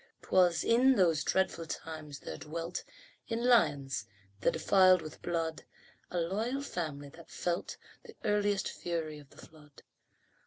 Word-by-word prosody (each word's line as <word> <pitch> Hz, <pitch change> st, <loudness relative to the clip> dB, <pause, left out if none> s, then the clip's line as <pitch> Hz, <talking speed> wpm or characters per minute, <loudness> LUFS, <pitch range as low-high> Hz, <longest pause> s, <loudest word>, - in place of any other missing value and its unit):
'Twas 180 Hz, -3 st, +3 dB
in 255 Hz, +3 st, +5 dB
those 165 Hz, -7 st, +3 dB
dreadful 190 Hz, -3 st, 0 dB
times 155 Hz, -3 st, -7 dB
there 80 Hz, -, -6 dB
dwelt 165 Hz, +3 st, -5 dB, 0.4 s
In 230 Hz, +1 st, -2 dB
Lyons, 145 Hz, -, +3 dB, 0.3 s
the -, -, +3 dB
defiled 185 Hz, -2 st, +5 dB
with 155 Hz, -, -10 dB
blood, 165 Hz, -2 st, -2 dB, 0.5 s
A 180 Hz, -, -4 dB
loyal 220 Hz, +11 st, -1 dB
family 150 Hz, -, -4 dB
that 165 Hz, +3 st, -15 dB
felt 175 Hz, -1 st, -3 dB, 0.3 s
The 450 Hz, -, -12 dB
earliest 205 Hz, -1 st, +1 dB
fury 160 Hz, -3 st, -4 dB
of 145 Hz, -2 st, -16 dB
the -, -, -20 dB
flood. 150 Hz, -2 st, -18 dB
170 Hz, 140 wpm, -32 LUFS, 155-200 Hz, 0.5 s, in